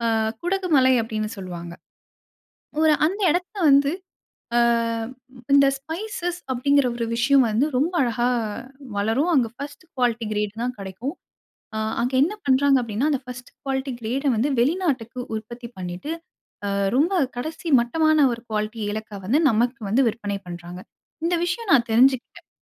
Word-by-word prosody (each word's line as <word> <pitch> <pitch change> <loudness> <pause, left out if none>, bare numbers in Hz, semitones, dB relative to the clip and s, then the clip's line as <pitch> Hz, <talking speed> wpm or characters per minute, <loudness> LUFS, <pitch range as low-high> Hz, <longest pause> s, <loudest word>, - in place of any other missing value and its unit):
அ - - +2 0.2
"குடகு 370 +1 -1
மலை" 260 -1 +5
அப்டின்னு 215 -1 -3
சொல்லுவாங்க. 175 -3 -7 1.1
ஒரு 315 -1 +5 0.2
அந்த 395 +5 -4
எடத்துல 360 +5 -2
வந்து 280 0 +5 0.7
ஆ - - +6 0.9
இந்த 280 0 +7
"ஸ்பைசஸ்" 350 +4 -4
அப்படிங்கிற 280 +2 +3
ஒரு 235 -1 -2
விஷயம் 265 +3 +4
வந்து 220 +6 +2
ரொம்ப 315 +8 +1
அழகா 240 0 0 0.7
வளரும். 225 +12 +1
அங்க 250 -4 +3
ஃபர்ஸ்ட் 285 +4 -8
குவாலிட்டி 240 -3 0
கிரேட் 210 -1 -1
தான் 250 +1 -2
கிடைக்கும். 195 - -5 0.6
அ - - -1 0.2
அங்க 245 +2 0
என்ன 345 +8 +1
பண்றாங்க 270 +1 +4
அப்டின்னா, 235 +6 -1
அந்த 280 -4 0
ஃபர்ஸ்ட்டு 250 -1 -9
குவாலிட்டி 270 -1 -2
கிரேட 245 +5 -2
வந்து, 235 +7 +1
வெளிநாட்டுக்கு 265 -5 0 0.2
உற்பத்தி 235 +2 -8
பண்ணிட்டு 180 - -5 0.5
அ - - -1 0.3
ரொம்ப 330 +8 +3 0.2
கடைசி 320 +6 -5
மட்டமான 310 +6 +2
ஒரு 235 - -5
குவாலிட்டி 215 +1 -2
ஏலக்கா 215 0 -5
வந்து, 270 +10 +3
நமக்கு 240 +4 +1
வந்து 245 +7 +3
விற்பனை 205 -3 -3
பண்ணுறாங்க. 175 +1 -8 0.4
இந்த 345 +1 +1
விஷயம் 370 +4 -2
நான் 245 -3 +4
தெரிஞ்சுக்கிட்டேன். 255 +2 +2
255 Hz, 145 wpm, -23 LUFS, 225-290 Hz, 1.1 s, இந்த